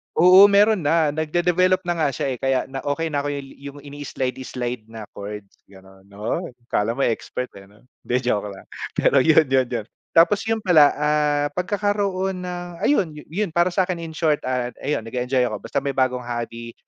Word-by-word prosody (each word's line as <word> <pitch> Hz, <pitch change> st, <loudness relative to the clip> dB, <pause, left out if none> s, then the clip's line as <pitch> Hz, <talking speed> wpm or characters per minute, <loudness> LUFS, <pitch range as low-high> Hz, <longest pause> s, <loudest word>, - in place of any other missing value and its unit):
Oo, 185 Hz, +4 st, +8 dB
meron 205 Hz, +1 st, +4 dB
na, 160 Hz, -1 st, +3 dB
nagde-develop 175 Hz, +4 st, +1 dB
na 175 Hz, -1 st, -1 dB
nga 150 Hz, -3 st, +2 dB
siya 135 Hz, -, -2 dB
eh 125 Hz, -, -4 dB
kaya 135 Hz, -1 st, +1 dB
na 135 Hz, -, -4 dB
okey 160 Hz, +3 st, -1 dB
na 145 Hz, -, 0 dB
ako 145 Hz, -, -1 dB
'yung 140 Hz, 0 st, -9 dB
ini-slide-slide 130 Hz, -4 st, -5 dB
na 110 Hz, -1 st, -9 dB
chords 100 Hz, -1 st, -8 dB, 0.2 s
gano'n. 95 Hz, 0 st, -18 dB
Oh, 115 Hz, -, -3 dB, 0.2 s
kala 115 Hz, +3 st, 0 dB
mo 140 Hz, -, 0 dB
expert, 125 Hz, +2 st, -2 dB
eh, 100 Hz, -, -15 dB
'no, 105 Hz, +2 st, -23 dB, 0.2 s
'di 125 Hz, -, +2 dB
joke 105 Hz, -4 st, 0 dB
lang, -, -, -13 dB, 0.3 s
pero 140 Hz, -, +3 dB
'yun, 160 Hz, +3 st, +5 dB
'yun, 130 Hz, -1 st, +2 dB
'yun. 115 Hz, -4 st, -4 dB, 0.3 s
Tapos 185 Hz, +5 st, +5 dB
'yun 225 Hz, 0 st, +1 dB
pala, 155 Hz, -6 st, +6 dB
ah, 150 Hz, 0 st, +1 dB
pagkakaroon 195 Hz, -1 st, -1 dB
ng 180 Hz, -1 st, -5 dB, 0.2 s
ayun 240 Hz, -, +2 dB, 0.2 s
'yun 195 Hz, +3 st, -2 dB
para 175 Hz, +1 st, +3 dB
sa'kin 185 Hz, -1 st, -1 dB
in 160 Hz, -1 st, -7 dB
short 155 Hz, -3 st, +1 dB
at 125 Hz, -2 st, -2 dB
ayun 135 Hz, -5 st, -2 dB
nag-e-enjoy 125 Hz, +2 st, 0 dB
ako 105 Hz, -3 st, -4 dB
basta 115 Hz, -, -5 dB
may 140 Hz, -1 st, -2 dB
bagong 125 Hz, -1 st, 0 dB
hobby, 115 Hz, -1 st, -5 dB
145 Hz, 180 wpm, -22 LUFS, 125-175 Hz, 0.3 s, Oo